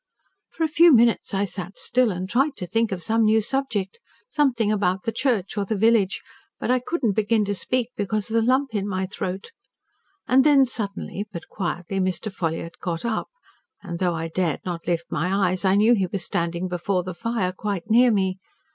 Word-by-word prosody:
"For 330 - -3
a - - +3
few 335 +2 +6
minutes, 235 -3 +4
I 200 0 0
sat 185 -1 -7
still, 250 -1 +2
and 185 -1 -3
tried 270 +7 +1
to 180 - -4
think 225 +4 0
of 180 -3 -3
some 225 +1 +1
new 220 0 +4
subject 240 - -2 0.3
something 245 -8 +2
about 195 -2 0
the 225 - -1
church 225 -4 -1
or - - +1
the 210 +2 -2
village. 220 -2 +2 0.4
But - - -1
I 255 - +3
could 315 +6 -4
not 215 -4 +3
begin 215 +1 +1
to 205 - -1
speak 245 +4 -1
because 210 0 -2
of 225 - -7
the 230 - +3
lump 260 +2 +1
in 205 -2 -1
my 190 -1 -1
throat. 190 - -5 0.8
And 260 +1 +5
then, 280 -2 +6
suddenly, 205 -3 -4
but 170 - -8
quietly, 175 +1 -3
Mr. 185 +2 -2
Ffolliott 165 -1 -4
got 170 +3 -3
up. 225 -2 -1 0.6
And 175 -4 -6
though 180 -2 +1
I 165 0 -3
dared 165 -2 -1
not 175 -2 -5
lift 170 -1 0
my 185 +1 +1
eyes, 185 +1 -3
I 190 0 +4
knew 215 +4 +5
he 195 -5 +1
was 185 0 -4
standing 170 -1 -2
before 180 +1 -1
the 185 +1 -5
fire, 225 -1 -2
quite 200 0 -4
near 245 +2 +6
me. 190 -2 0
205 Hz, 205 wpm, -24 LUFS, 185-230 Hz, 0.8 s, few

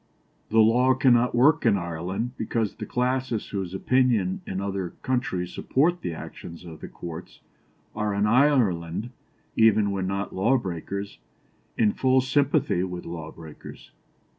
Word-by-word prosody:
The 110 - 0
law 125 +4 +4
cannot 125 -2 +3
work 145 +6 +4
in 110 -4 +4
Ireland 90 +6 -3
because 110 -1 -2
the - - -7
classes 125 -2 -1
whose 95 -2 -4
opinion 115 -5 +1
in 95 - -3
other 95 -2 -3
countries 110 -9 -1
supports 170 +6 +1
the - - -3
actions 85 +1 -9
of 80 -2 -10
the - - -6
courts, 85 0 -9 0.5
are 105 -1 -1
in 100 +1 +2
Ireland, 110 - +2 0.4
even 110 -2 +4
when 95 -1 -2
not 100 +1 -3
law 115 +8 +2
breakers, 100 0 -5 0.6
in 105 -2 +3
full 130 0 +3
sympathy 140 - +1
with 90 -1 -5
law 80 -2 -6
breakers." 80 -2 -12
105 Hz, 140 wpm, -25 LUFS, 90-125 Hz, 0.6 s, law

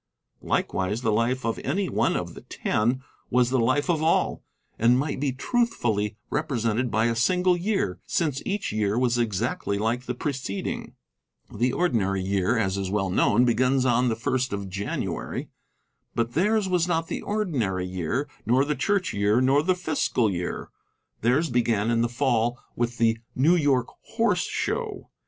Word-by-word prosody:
Likewise 105 +6 -1
the 110 - +2
life 115 +3 0
of 115 - -1
any 190 +8 -1
one - - +1
of - - -4
the - - -10
Ten 120 +5 -1 0.3
was 125 0 +2
the 130 - +2
life 130 +5 +2
of 165 -4 +1
all, 155 - +1 0.4
and 120 +2 +5
might 140 +1 -1
be 140 -1 0
truthfully 120 - 0
represented 125 -5 0
by 110 +1 +1
a 115 0 +1
single 180 +9 +3
year, 180 - -1
since 150 -5 0
each 205 0 -2
year 105 0 0
was 120 -1 +2
exactly 100 -2 -1
like 115 +4 -1
the 125 - -2
preceding. 130 -8 -4 0.6
The 125 +1 +1
ordinary 100 - +1
year, 100 +4 +1
as 100 -3 0
is 95 -1 -2
well 95 -2 0
known, 115 +6 +3
begins 130 +2 +2
on 125 0 +3
the 110 - 0
first 130 +1 -1
of 100 -1 -4
January. 100 +2 -3 0.7
But 115 0 -1
theirs 210 +4 +2
was 180 -2 +1
not 165 -2 0
the - - -4
ordinary 130 - -1
year, 90 - -2 0.2
nor 130 +4 +3
the 150 - 0
Church 195 +4 0
year, 105 +3 +2
nor 135 +3 +4
the 185 +4 +2
fiscal 145 - 0
year. 90 -1 -4 0.5
Theirs 130 +7 +2
began 115 -2 +1
in 115 0 +2
the 120 - +1
Fall 120 -1 +1 0.2
with 120 0 -1
the 115 -1 +2 0.2
New 155 +7 +4
York 140 -7 +2 0.3
Horse - - +2
Show. - - -3
120 Hz, 165 wpm, -25 LUFS, 110-145 Hz, 0.7 s, and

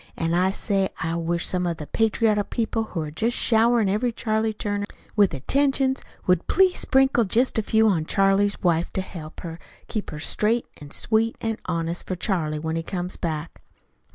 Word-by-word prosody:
An' 165 0 -1
I 180 +2 +3
say 195 -1 0
I 165 0 -2
wish 170 0 -1
some 180 -1 0
of 170 -2 -2
the 150 - -6
patriotic 215 +1 +1
people 225 -1 -1
who 175 -6 -4
are 150 -1 -5
jest 225 +10 0
showerin' 230 -1 +3
every 215 +5 +1
Charlie 220 -1 0
Turner 205 -1 -3 0.3
with 205 -3 +4
attentions 265 - +1 0.2
would 180 -2 +2
please 375 -1 +3
sprinkle 265 -2 +3
jest 230 +4 +2
a - - +2
few 220 +1 +3
on 165 -6 +1
Charlie's 195 +1 +2
wife, 170 -1 +1
to 190 - 0
help 165 -4 -9 0.5
keep 215 -3 -4
her 150 - -6
straight 215 +9 0 0.2
an' 145 - -9
sweet 225 +7 +1
an' 225 -1 -2
honest 165 +1 -2
for 185 - -2
Charlie 170 -5 -1
when 160 +1 -3
he - - -1
comes 180 +1 -4
back." 160 -2 -4
200 Hz, 180 wpm, -24 LUFS, 170-225 Hz, 0.5 s, with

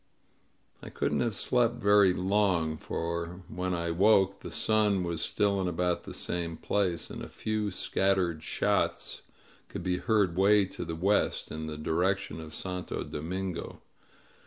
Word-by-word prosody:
I - - -8
couldn't - - -1
have 115 -4 0
slept 120 +2 +2
very 100 -4 +5
long, 90 -4 +1
for 85 +3 -4
when 90 0 -2
I 85 0 -1
woke 100 +1 +4
the - - -8
sun 105 -3 +2
was 85 -2 -1
still 100 +1 +1
in 95 - -1
about 90 0 -1
the - - -7
same 85 -2 -3
place, 95 -4 -1
and - - -7
a - - -7
few 110 -1 -2
scat 95 +1 +1
tered 85 -4 -1
shots - - 0 0.5
could - - -6
be 90 0 0
heard 100 -5 +2
way 100 +2 +5
to 90 - -7
the 85 0 -4
west, 100 +5 +1
in 80 0 -5
the 75 -1 -5
direc 85 +5 +1
tion 80 -5 -8
of 80 -1 -8
Santo 90 +1 -4
Domingo. 90 +3 -5
90 Hz, 160 wpm, -29 LUFS, 85-100 Hz, 0.5 s, very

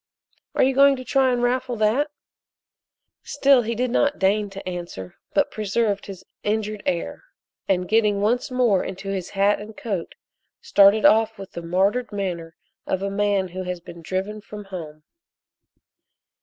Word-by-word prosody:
"Are - - +4
you 265 +1 +3
going 275 +1 +6
to 255 - -7
try 265 0 +2
and 245 -1 0
raffle 250 0 0
that?" 225 +7 +1 1.1
Still 275 -2 +3
he 230 0 -3
did 250 +1 -1
not 285 +3 +2
deign 205 +2 +1
to 195 -1 -9
answer, 175 - -6 0.2
but 290 - +2
preserved 210 -1 -1
his 190 -2 -9 0.2
injured 215 0 -2
air, 170 - -2 0.4
and 180 -2 +1
getting 210 -2 +2
once 230 +5 +1
more 245 -7 +2
into 195 +1 -6
his 190 -3 -3
hat 200 +1 +2
and 215 +1 -10
coat 195 -7 -4 0.4
started 205 - +5
off 220 0 +4
with 195 -1 -9
the 170 - -6
martyred 195 +9 0
manner 175 -5 -4 0.3
of 190 +1 -1
a 200 - -2
man 200 -2 +1
who 185 +2 -6
has 180 -1 -4
been 170 0 -12
driven 190 +5 -3
from 210 -1 -9
home. 160 -5 -8
205 Hz, 160 wpm, -23 LUFS, 185-235 Hz, 1.1 s, going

